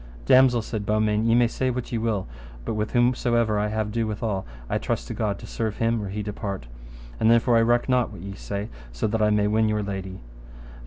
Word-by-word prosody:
Damosel, 125 Hz, -, +5 dB
said 110 Hz, -2 st, -4 dB
Beaumains, 105 Hz, +1 st, +1 dB
ye 115 Hz, -, +4 dB
may 120 Hz, 0 st, +5 dB
say 130 Hz, +2 st, -1 dB
what 125 Hz, -1 st, -4 dB
ye 115 Hz, -, -1 dB
will, 110 Hz, -4 st, -1 dB, 0.4 s
but -, -, -2 dB
with 105 Hz, 0 st, -2 dB
whomsomever 120 Hz, -3 st, +2 dB
I 105 Hz, -, +1 dB
have 110 Hz, 0 st, -2 dB
ado 115 Hz, +1 st, -1 dB
withal, 105 Hz, -2 st, -3 dB, 0.2 s
I -, -, -1 dB
trust -, -, -2 dB
to -, -, -3 dB
God 105 Hz, -2 st, -1 dB
to -, -, -10 dB
serve 110 Hz, -2 st, -3 dB
him 115 Hz, -1 st, +1 dB
or 100 Hz, -, -5 dB
he 105 Hz, +2 st, -4 dB
depart. 100 Hz, -, -5 dB, 0.5 s
And 110 Hz, -, +3 dB
therefore 115 Hz, +1 st, +4 dB
I 115 Hz, -, +5 dB
reck 120 Hz, +1 st, +2 dB
not 125 Hz, -2 st, +2 dB
what -, -, -10 dB
ye 100 Hz, +1 st, -6 dB
say, 100 Hz, +2 st, -5 dB, 0.2 s
so -, -, -3 dB
that 110 Hz, +1 st, 0 dB
I 105 Hz, -, +4 dB
may 105 Hz, -1 st, +2 dB
win 110 Hz, +1 st, +2 dB
your 105 Hz, -1 st, 0 dB
lady. 95 Hz, -2 st, -5 dB
110 Hz, 225 wpm, -25 LUFS, 105-115 Hz, 0.5 s, Damosel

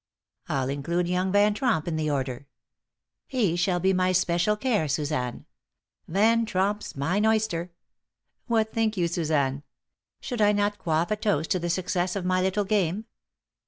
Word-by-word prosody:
I'll 130 Hz, -2 st, 0 dB
include 170 Hz, +6 st, -1 dB
young 180 Hz, +1 st, 0 dB
Van 205 Hz, +1 st, +4 dB
Tromp 205 Hz, -, 0 dB
in 165 Hz, -, -1 dB
the 155 Hz, -1 st, -1 dB
order. 135 Hz, -1 st, -3 dB, 0.8 s
He 215 Hz, -10 st, +1 dB
shall 175 Hz, +1 st, +1 dB
be 190 Hz, +2 st, +2 dB
my 185 Hz, 0 st, +2 dB
special 180 Hz, +3 st, +2 dB
care, 215 Hz, -9 st, 0 dB
Suzanne. 145 Hz, -4 st, -2 dB, 0.6 s
Van 220 Hz, +6 st, +3 dB
Tromp's 205 Hz, +1 st, -1 dB
mine 165 Hz, +9 st, 0 dB
oyster! 220 Hz, -6 st, +1 dB, 0.8 s
What 220 Hz, -2 st, +1 dB
think 220 Hz, -2 st, 0 dB
you, 175 Hz, -2 st, +2 dB
Suzanne? 150 Hz, -5 st, 0 dB, 0.6 s
Should 245 Hz, -4 st, -4 dB
I 210 Hz, 0 st, +5 dB
not 205 Hz, 0 st, 0 dB
quaff 165 Hz, +1 st, 0 dB
a -, -, +3 dB
toast 205 Hz, -7 st, -1 dB
to 185 Hz, -, +2 dB
the 175 Hz, 0 st, -3 dB
success 180 Hz, +1 st, -1 dB
of 190 Hz, -2 st, -3 dB
my 185 Hz, 0 st, +2 dB
little 190 Hz, +2 st, 0 dB
game?" 195 Hz, 0 st, 0 dB
185 Hz, 160 wpm, -26 LUFS, 160-210 Hz, 0.8 s, I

